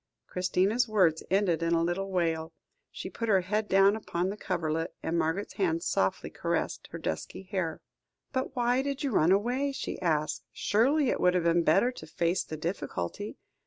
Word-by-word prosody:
Christina's 185 +6 +1
words 185 -7 +3
ended 190 -4 +2
in 165 0 +2
a 165 - +2
little 185 +3 -1
wail; 165 -3 -1 0.4
she - - -7
put 230 -1 -4
her 195 -3 +5
head 210 +4 -1
down 195 +2 +5
upon 185 -4 -2
the 200 - -3
coverlet, 165 -5 -2
and 165 - -1
Margaret's 170 +4 -1
hands 165 -2 +1
softly 95 - 0
caressed - - -2
her - - -6
dusky 80 - -4
hair. 185 -4 -3 0.5
"But 260 0 -2
why 245 +1 +2
did 280 +1 -3
you 275 - 0
run 170 -4 +4
away?" 245 +8 +2
she 270 - -5
asked. 155 -4 0
"Surely 265 +6 +2
it - - -1
would 180 0 +4
have 180 - +2
been 170 0 +3
better 195 +11 +4
to 160 -10 -11
face 170 +3 0
the 155 - -6
difficulty? 155 - -4
185 Hz, 180 wpm, -29 LUFS, 165-215 Hz, 0.5 s, her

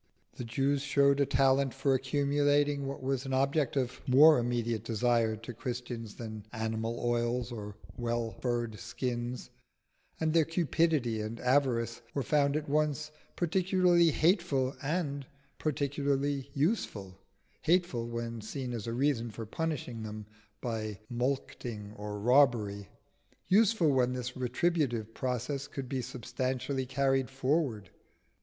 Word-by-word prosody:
The - - -6
Jews 135 +4 0
showed 140 -1 +3
a 140 - +3
talent 135 -1 +3
for 135 0 +2
accumulating 145 +1 +2
what 135 -1 -6
was 135 -1 0
an 135 - -2
object 140 +1 +1
of 125 -2 -1
more 150 +3 +8
immediate 120 -2 -1
desire 115 0 +1
to 115 +3 -8
Christians 120 -2 -5
than 110 -2 -7
animal 110 0 -2
oils 120 +1 0
or 105 -3 -6 0.2
well 120 -1 -1
furred 120 -4 -2
skins, 120 +1 -4 0.7
and 160 -1 +1
their 165 -1 +5
cupidity 160 -8 +1
and 110 +2 -5
avarice 125 -3 +1
were 140 - 0
found 145 -1 +2
at 155 - -4
once 150 +1 0 0.2
particularly 180 -1 +3
hateful 155 -5 +2
and 145 -3 -2 0.3
particularly 140 -1 -1
useful: 110 - -1 0.4
hateful 165 -9 +1
when 115 -1 -4
seen 125 +3 -5
as 115 -2 -4
a 115 - -2
reason 125 -2 +1
for 110 +1 -7
punishing 130 -3 -3
them 110 -1 -6 0.4
by 110 -4 -3
mulcting 120 -4 -3
or 105 0 -5
robbery, 110 -5 +3 0.6
useful 200 -5 +4
when 125 -2 +2
this 125 0 -4
retributive 125 -3 0
process 130 +3 -2
could 135 -2 -6
be 130 0 -2
successfully 130 +2 -3
carried 135 -1 +1
forward. 135 - -1
130 Hz, 130 wpm, -31 LUFS, 115-145 Hz, 0.7 s, more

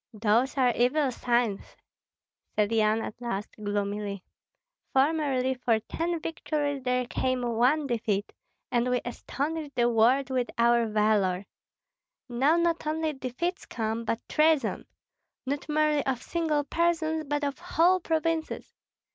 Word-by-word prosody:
"Those 225 +6 +2
are 250 -2 +4
evil 260 +3 +2
signs," 235 -4 -1 0.8
said 210 0 +2
Yan 220 0 +2
at 215 - -7
last, 210 -4 -3
gloomily. 205 -1 -2 0.7
"Formerly 270 -2 +2
for 245 -3 +1
ten 335 +9 -3
victories 295 -3 -2
there 250 0 0
came 255 +1 -1
one 245 +6 +2
defeat, 220 -5 -1 0.4
and 240 +1 +1
we 250 0 +2
astonished 285 +4 -4
the 240 -1 +3
world 245 +4 +3
with 250 -2 0
our 235 0 +4
valor. 210 -3 +1 0.8
Now 265 +6 +2
not 340 -2 0
only 315 0 -1
defeats 285 +8 -4
come, 225 0 -2
but 230 0 -3
treason, 305 -6 +2 0.6
not 280 +3 -3
merely 300 -1 +2
of 260 -2 -1
single 315 -4 0
persons, 320 0 0
but 290 +1 -1
of 280 -1 -2
whole 355 +1 +3
provinces. 325 -1 -2
255 Hz, 130 wpm, -28 LUFS, 230-305 Hz, 0.8 s, are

